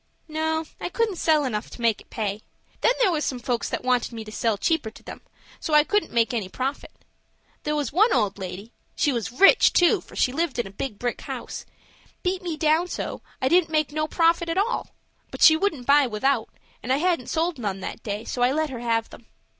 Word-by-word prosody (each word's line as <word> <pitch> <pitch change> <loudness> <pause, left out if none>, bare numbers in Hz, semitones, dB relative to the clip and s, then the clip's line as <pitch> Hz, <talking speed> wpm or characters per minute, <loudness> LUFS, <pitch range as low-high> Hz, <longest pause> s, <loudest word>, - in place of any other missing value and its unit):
"No, 315 +1 -1
I - - -3
couldn't 435 -1 -1
sell 310 -3 +3
enough 215 -4 -3
to - - -12
make 230 -2 +2
it - - -20
pay. 210 -2 -3 0.4
Then 485 - +4
there 415 -7 +4
was 305 -3 -1
some 260 - -2
folks 240 -1 -2
that - - -3
wanted 250 -1 +1
me 225 -1 -6
to 215 - -10
sell 220 -1 0
cheaper 320 0 0
to 220 - -17
them; - - -9 0.4
so 310 - 0
I 300 - +7
couldn't 415 +6 0
make 235 +1 +2
any 210 -6 -2
profit. 265 +7 -4 0.7
There 300 0 -1
was 290 -4 -2
one 425 +8 +4
old 205 -4 +1
lady—she 200 - -4
was 235 0 -3
rich, 390 - +6
too, 350 -2 +4
for - - -16
she 250 - +1
lived 325 0 -1
in 240 - 0
a 195 - -9
big 210 +2 -5
brick 245 +2 -3
house—beat 370 +1 -7
me 340 -4 -4
down 315 +3 +2
so, - - -5 0.2
that - - 0
I - - +3
didn't 350 0 +4
make 310 -2 +1
no 310 +1 -1
profit 335 +1 +2
at 330 - -1
all; 425 +5 0 0.4
but - - -2
she 315 - +9
wouldn't 315 -7 -1
buy 285 0 +5
without, 230 +1 0 0.3
and 250 - -3
I 265 - +4
hadn't 335 -5 0
sold 330 -2 -1
none 200 -4 -3
that - - -6
day; 210 +1 -4
so 245 - -4
I 245 +1 +4
let 310 0 -1
her 250 - -5
have 230 -1 -1
them. 225 - -14
275 Hz, 225 wpm, -24 LUFS, 230-325 Hz, 0.7 s, she